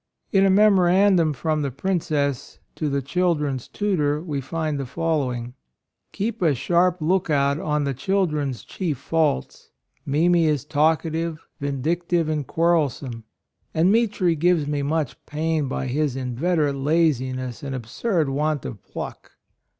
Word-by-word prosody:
In 195 0 +4
a - - +3
memorandum 190 -3 +4
from 155 +2 -1
the 140 - -1
Princess 145 -2 -2 0.2
to 155 - -2
the 140 -1 -1
children's 150 -5 0
tutor 155 -8 0
we 150 -4 -4
find 155 +1 -2
the 135 - -3
following: 130 -6 -2 0.6
"Keep 220 +2 -3
a 160 -5 +3
sharp 175 +7 +2
lookout 155 -4 +1
on 150 -2 0
the 140 -1 -1
children's 150 - -1
chief 165 -8 -3
faults. 155 - -1 0.3
Mimi 170 +4 +3
is 145 -2 0
talkative, 160 +1 0
vindictive 160 +4 -1
and 150 -4 -2
quarrelsome; 145 -8 0 0.5
and 170 +4 +4
Mitri 205 -6 +2
gives 165 -1 +2
me 145 0 -1
much 150 -1 -2
pain 155 -1 -1
by 130 - -3
his 140 +1 -1
inveterate 140 +3 0
laziness 130 -5 0
and 135 -1 -4
ab 120 -3 -6
surd 165 - 0
want 150 +1 -1
of 105 -5 -7
pluck." - - -8
155 Hz, 135 wpm, -23 LUFS, 140-170 Hz, 0.6 s, In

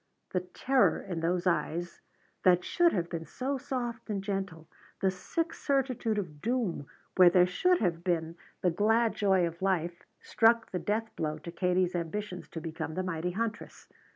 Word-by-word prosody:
The 180 - +1
terror 250 +9 +2
in 175 -4 -5
those 175 +2 0
eyes 170 0 -1 0.4
that 180 -1 +4
should 345 -1 +3
have 175 -4 -1
been 165 -2 -4
so 270 +1 -3
soft 240 -3 -4
and 200 -2 -2
gentle, 195 -5 -4 0.3
the 190 -1 +2
sick 320 - -3
certitude 255 -6 0
of 155 -8 -5
doom 220 - -1 0.3
where 180 -1 +9
there 180 0 +5
should 360 - +2
have 170 -4 0
been 165 -2 -1 0.3
the 180 - +3
glad 225 +5 +2
joy 190 -3 +3
of 170 +1 -6
life 175 -3 -1
struck 230 0 +3
the 180 - -2
death 220 +5 -2
blow 155 -1 -2
to 165 +2 -8
Katie's 180 +1 +1
ambitions 180 +2 -4
to 165 - -6
become 160 0 -5
the 185 - -1
mighty 180 -1 -2
huntress. 220 +1 -4
185 Hz, 170 wpm, -30 LUFS, 170-225 Hz, 0.4 s, where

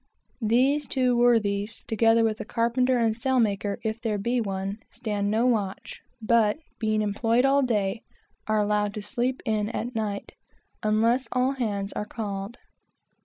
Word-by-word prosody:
These 260 +6 +2
two 255 -2 +1
worthies, 220 -3 +2
together 225 0 +3
with 220 -1 0
the - - -3
carpenter 245 +3 +1
and 225 -2 +2
sailmaker, 220 -5 0
if 220 0 -3
there 220 -3 -1
be 235 +4 0
one, 195 0 -3
stand 210 -4 -2
no 220 +3 +2
watch, 210 -6 -1 0.2
but, 225 0 +3 0.2
being 215 -1 +1
employed 225 +4 +1
all 275 +1 +4
day, 220 -4 0 0.5
are 215 0 +2
allowed 210 -1 +1
to 210 - -5
"sleep 250 +4 -2
in" 215 -2 0
at 240 +1 -4
night, 210 -3 -3 0.5
unless 225 +4 +2
all 255 +1 +2
hands 205 -7 -3
are 210 - -3
called. 205 0 -5
225 Hz, 150 wpm, -26 LUFS, 210-240 Hz, 0.5 s, all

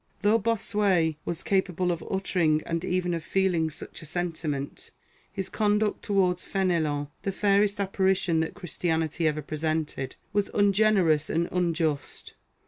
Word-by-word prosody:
t - - -42
Though 220 +2 +5
Bossuet 200 -7 +1
was 170 - -3
capable 185 -2 +1
of 165 -2 -3
uttering 170 -5 +1
and 165 0 -2
even 180 -1 0
of 165 -1 -3
feeling 180 -4 +1
such 155 - -9
a 155 - -8
sentiment, 155 -4 -3 0.4
his 195 -1 -4
conduct 210 0 +1
towards 185 -3 +1
Fenelon, 160 -7 0
the 195 - -1
fairest 200 +1 +2
apparition 190 -3 +1
that 160 - -2
Christianity 165 -1 -1
ever 155 0 -1
presented, 155 -3 -2 0.2
was 205 0 +1
ungenerous 200 -6 +3
and 170 +2 +1
unjust. 165 -4 -1
175 Hz, 135 wpm, -27 LUFS, 160-195 Hz, 0.4 s, Though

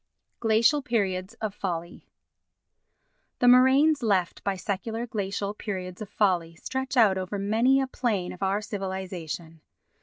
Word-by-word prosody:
Glacial 230 +6 +3
Periods 195 -4 -1
of 215 -3 -4
Folly 175 -4 -5 1.3
The 245 - +2
moraines 265 +4 +6
left 195 -6 0
by 200 -1 0
secular 220 +5 -3
glacial 200 -2 -3
periods 185 -3 -6
of 210 - -6
folly 175 -5 +1
stretch 265 +8 -4
out 200 -5 +5
over 185 +2 -4
many 225 +7 +3
a 270 - +1
plain 225 -8 -2
of 180 - -13
our 195 +2 +1
civilisation. 185 -5 -5
200 Hz, 130 wpm, -27 LUFS, 185-235 Hz, 1.3 s, moraines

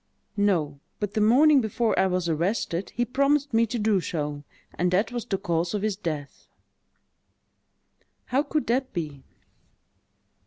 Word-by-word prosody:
"No—but 190 0 -1
the 215 - 0
morning 270 +6 +6
before 225 +1 0
I 190 - +4
was 180 -2 -1
arrested, 170 +2 -1
he 240 - +1
promised 280 +2 +1
me 230 +1 +3
to 240 - -3
do 210 -3 +2
so; 150 -4 -4 0.3
and 180 +2 0
that 190 +7 +1
was 240 -2 -4
the 195 - -1
cause 170 -1 -1
of 205 - -2
his 215 -2 0
death." 155 -7 -6 1.8
"How 265 +3 +1
could 300 0 -2
that 255 +2 0
be?" 150 -6 -4
205 Hz, 145 wpm, -26 LUFS, 170-240 Hz, 1.8 s, morning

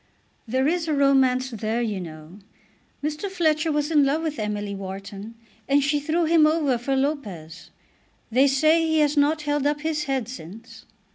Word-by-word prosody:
"There 260 +4 +1
is 335 +1 0
a 310 - 0
romance 265 -2 +3
there, 220 +1 -2
you 210 -4 -2
know. 160 +2 -10 0.6
Mr. 305 +6 -3
Fletcher 320 -4 +1
was 295 +1 -1
in 295 -3 +5
love 290 +4 +1
with 305 -4 -3
Emily 210 -1 -3
Wharton, 195 +3 -8 0.3
and 280 0 +4
she 285 +2 +1
threw 320 +4 0
him 320 -1 +5
over 300 -6 +1
for 270 +3 -1
Lopez. 235 - -4 0.6
They 260 +4 +4
say 310 +4 +3
he 320 -1 +1
has 295 0 +2
not 300 +2 +2
held 290 -1 0
up 295 0 -1
his 305 -1 -2
head 265 -5 -2
since." 225 +1 -11
275 Hz, 170 wpm, -24 LUFS, 225-305 Hz, 0.6 s, in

